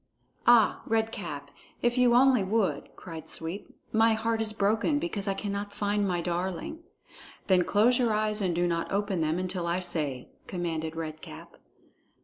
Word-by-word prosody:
"Ah, 235 -2 +5
Red 225 0 +1
Cap, 145 -10 -6 0.3
if 240 0 +2
you 250 -2 +4
only 255 -2 +5
would!" 205 +1 0
cried 165 -3 -9
Sweep. 165 +5 -3 0.2
"My 225 +1 +4
heart 225 0 -1
is 220 -1 +3
broken 215 +7 +1
because 290 - -3
I 195 - 0
cannot 200 0 -4
find 205 0 0
my 175 -2 0
darling." 180 - -3 0.7
"Then 185 -2 +4
close 225 +7 +3
your 240 -3 +2
eyes 215 0 0
and 180 -3 0
do 175 +1 +1
not 170 -1 -2
open 200 -3 0
them 155 +1 0
until 180 -1 -2
I 170 +2 0
say," 150 -8 -2 0.2
commanded 165 -3 -3
Red 155 -1 -5
Cap. 75 - -11
200 Hz, 165 wpm, -28 LUFS, 170-220 Hz, 0.7 s, Ah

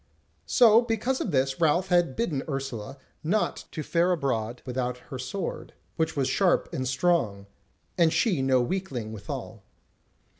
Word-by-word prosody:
So 230 -2 +6
because 240 +3 -1
of - - -2
this 135 0 0
Ralph 170 +4 +3
had 175 -7 +3
bidden 155 -12 -1
Ursula 135 -2 -4 0.3
not 200 +7 0
to 155 - -4
fare 170 +4 +2
abroad 125 -7 -1
without 125 -1 -2
her 130 +1 -9
sword, 160 +10 -5 0.2
which 160 -2 -1
was 135 -2 +1
sharp 180 +7 +2
and 130 -1 -2
strong, 130 - +1 0.5
and 165 -2 +5
she 180 - +2
no 130 -1 +3
weakling 125 - -3
withal. 110 0 -7
140 Hz, 145 wpm, -27 LUFS, 125-180 Hz, 0.5 s, So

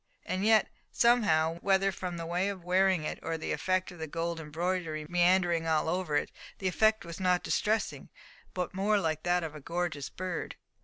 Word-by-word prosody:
And 185 +1 -2
yet, 220 0 +5 0.2
somehow, 170 -9 +3
whether 195 +1 +2
from 180 -1 -5
the 165 - -5
way 180 +4 0
of 190 -3 -6
wearing 185 -1 +3
it, - - -4
or 165 - -3
from 160 - -4
the - - -3
effect 185 +4 0
of 175 - -12
the 160 - -4
gold 165 +2 -3
embroidery 160 0 -2
meandering 175 -1 +3
over 160 0 +1
all, - - -4 0.3
the 190 - -2
effect 215 +2 +2
was 170 -1 -7
not 180 -1 +2
distressing, 220 +1 -1 0.5
but 180 -2 -2
more 205 +2 +2
like 155 -4 -1
that 175 0 +1
of 160 -2 -5
a 150 - -9
gorgeous 165 -2 -3
bird. 185 -1 -5
175 Hz, 190 wpm, -30 LUFS, 165-190 Hz, 0.5 s, yet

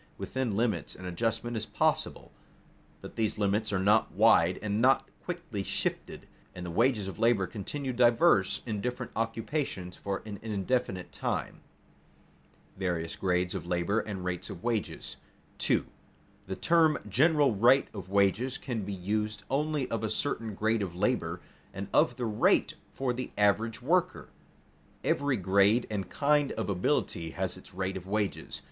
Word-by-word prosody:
Within 125 -6 -2
limits 115 -1 -1
an 90 - -10
adjustment 115 +6 -2
is 110 0 -3
possible, - - 0 0.7
but - - -10
these 110 -1 0
limits 105 +1 0
are 100 - +1
not 105 +4 +3
wide 85 +2 +4
and 105 +1 0
not 135 +1 +4 0.2
quickly 170 - -4
shifted, - - -3 0.3
and 90 -1 -6
the 85 - -5
wages 115 0 +2
of 95 - -7
labor 115 -4 +3
continue 125 +8 -4
diverse 120 - +4
in 105 -4 -3
different 125 +1 -3
occupations 115 - -2
for 100 -1 -4
an 105 -2 -7
indefinite 105 -2 -2
time. - - -3 1.1
[Sidenote: - - -28
Various 85 -3 -2
grades 90 -1 0
of - - -5
labor 90 +5 +1
and 100 -4 -5
rates 90 -1 -3
of 85 - -8
wages] 115 -3 -2 0.4
2. - - +2 0.6
The 95 - -3
term 160 - +4
general 145 - +4
rate 120 +7 +5
of 95 -4 -8
wages 100 +6 +2
can 120 -5 -4
be 100 +1 -4
used 105 +3 -2
only 150 -1 0
of 115 -1 -2
a 110 - 0
certain 115 -6 -2
grade 110 +2 +1
of 90 -4 -4
labor 90 -4 0 0.3
and 100 +1 -4
of 125 - +4
the 120 - -3
rate 105 -2 +2 0.2
for 130 -2 -1
the 130 +1 -4
average 110 +3 +2
worker. 180 +5 +1 0.7
Every 140 -2 +1
grade 100 +5 +3
and 100 -4 -3
kind 145 -1 +2
of 110 -2 -2
ability 85 -2 0
has - - -1
its - - -14
rate 95 0 -2
of 95 -1 -7
wages. 105 0 -2
110 Hz, 155 wpm, -30 LUFS, 95-125 Hz, 1.1 s, rate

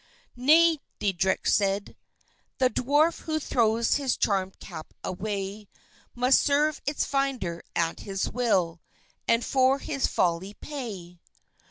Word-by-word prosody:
"Nay," 315 +5 +5 0.2
Deitrich 190 -1 0
said; 200 0 +1 0.6
"the 255 -1 +3
Dwarf 290 +8 +2
who 315 -1 -2
throws 230 -4 +2
his 275 -3 -1
charmèd 190 -2 0
cap 155 - -10
away, 200 +1 -4 0.5
Must 250 +2 +4
serve 295 +1 +1
its 290 - 0
finder 260 -12 -1
at 165 -1 0
his 195 -1 -3
will, 185 -9 0 0.5
and 230 +1 +2
for 260 0 +3
his 280 0 -1
folly 180 +3 0
pay. 200 - -7
230 Hz, 120 wpm, -27 LUFS, 190-275 Hz, 0.6 s, Nay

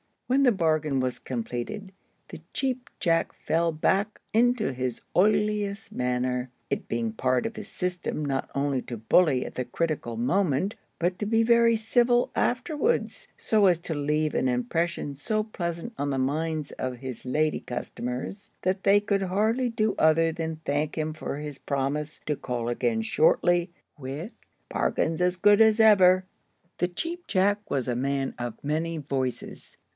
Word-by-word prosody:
When 265 +2 +2
the 250 - +6
bargain 155 - +1
was 130 -1 -2
completed, 125 - -5 0.4
the - - -8
Cheap 255 -2 -2
Jack 165 -1 +2
fell 165 +1 0
back 195 +7 0
into 240 - +3
his 125 -2 -3
oiliest 210 +1 +1
manner; 125 0 -1 0.2
it - - -2
being 115 -1 -1
part 125 +3 0
of 225 - -4
his - - -7
system 180 -4 -3
not 135 -1 -2
only 140 -2 0
to 120 - -6
bully 130 +4 +3
at - - -8
the 125 - -2
critical 155 -8 -2
moment, 175 - +1 0.2
but 180 +2 -1
to 210 - -1
be 225 +2 +3
very 235 0 +5
civil 240 +2 +2
afterwards, 330 - 0
so 215 -2 +3
as 180 -2 +4
to 170 - -4
leave 150 +1 0
an 130 - +1
impression 140 +4 -1
so 215 +10 -1
pleasant 175 0 -5
on 145 - 0
the 135 - -1
minds 155 +3 -1
of 130 -1 -2
his 130 -1 -7
lady 155 +4 +1
customers 125 - -5
that 185 +1 0
they 200 +1 +5
could 200 -1 0
hardly 215 +7 +1
do 215 -2 0
other 165 +1 +4
than 160 -1 -4
thank 145 +2 -1
him 155 0 -1
for 155 -2 -5
his 150 -2 -6
promise 145 +2 -2
to 150 - 0
call 120 -3 -3
again 120 -2 0
shortly 175 - +3 0.3
with 145 - -5 0.4
"bargains 165 +2 0
as 180 0 +2
good 205 +3 +5
as 220 0 +5
ever." 185 -4 +6 0.5
The 175 - +2
Cheap 335 - -5
Jack 205 +2 +1
was 130 -3 -1
a 125 - 0
man 135 +1 -1
of 120 -2 -5
many 160 +3 -1
voices. 135 -4 -4
165 Hz, 160 wpm, -27 LUFS, 135-205 Hz, 0.5 s, the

